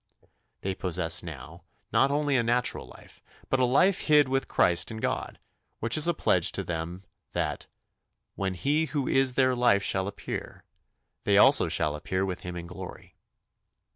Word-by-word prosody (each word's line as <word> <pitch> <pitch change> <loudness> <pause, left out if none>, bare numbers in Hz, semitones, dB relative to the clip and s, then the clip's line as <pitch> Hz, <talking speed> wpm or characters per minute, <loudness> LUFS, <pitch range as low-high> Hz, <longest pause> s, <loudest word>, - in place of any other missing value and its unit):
They 95 - -2
possess 90 -2 -2
now 80 +1 -10 0.3
not 135 - +4
only 145 0 0
a 125 - +4
natural 120 +1 0
life, - - -15 0.3
but 135 - +2
a 130 - +4
life 180 +10 +3
hid 150 -2 +5
with 135 +1 -1
Christ 85 -2 +2
in 110 - -6
God, - - -3 0.4
which 115 +1 0
is 155 +1 +5
a 170 - +2
pledge - - +1
to - - -3
them 85 +2 -5 0.3
that 75 -5 -3 0.7
"when 95 -1 -3
he 150 - +1
who 140 -2 -3
is 135 -1 +2
their 130 -1 +3
life 120 -5 +3
shall 95 0 0
appear, 100 - -7 0.6
they - - +3
also - - +6
shall 75 -2 +1
appear 95 +5 -2
with 90 -2 -4
him 90 0 -7
in 85 -1 -6
glory." 85 +1 -10
100 Hz, 170 wpm, -27 LUFS, 85-135 Hz, 0.7 s, also